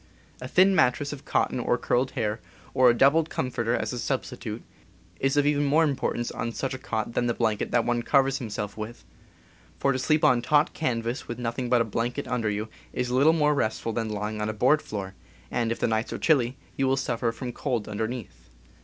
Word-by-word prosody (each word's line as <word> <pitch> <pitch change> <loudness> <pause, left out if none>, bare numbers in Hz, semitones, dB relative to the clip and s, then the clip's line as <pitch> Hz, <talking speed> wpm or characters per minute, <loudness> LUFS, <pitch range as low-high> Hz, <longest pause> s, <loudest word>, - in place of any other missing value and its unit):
A 125 - -5
thin 190 +7 +5
mattress 145 -4 +2
of 140 - -10
cotton - - 0
or - - +1
curled 125 +2 +1
hair, 110 -2 -1 0.3
or 130 -1 +6
a - - +5
doubled 150 +6 +4
comforter 120 -2 -1
as - - -2
a 125 - -4
substitute, - - -4 0.6
is 135 +1 +1
of 145 - +4
even 145 0 +2
more 150 +3 +4
importance 135 -5 -1
on 115 0 -4
such 135 +2 -3
a 130 - -5
cot 110 -1 -3
than 120 - +1
the 120 - 0
blanket 110 -3 0
that 120 -2 +2
one 120 -1 +1
covers 135 +2 +2
himself 105 -3 -4
with; 110 +2 -7 0.7
for 140 - +2
to 130 - -1
sleep 155 +3 +2
on 125 -1 +5
taut 150 +4 +3
can 125 -7 -1
vas 120 +3 -4
with 120 - -5
nothing 120 +1 -3
but 120 -1 +4
a - - +1
blanket 120 +5 -2
under 120 -4 0
you 105 +1 -2 0.2
is 125 0 -2
little 135 +5 +5
more 150 -2 +3
restful 115 -4 -1
than 115 -1 -2
lying 105 0 -3
on 105 - -1
a - - -2
board 130 +8 +3
floor, 95 -2 -6 0.4
and, 115 -2 0
if 115 - -1
the - - +1
nights 110 0 -1
are - - -3
chilly, 130 -5 +2 0.2
you 135 - +1
will 135 +1 +2
suffer 120 -3 -1
from 125 +1 -6
cold 115 -4 -2
underneath. 110 - -5
120 Hz, 215 wpm, -26 LUFS, 115-135 Hz, 0.7 s, or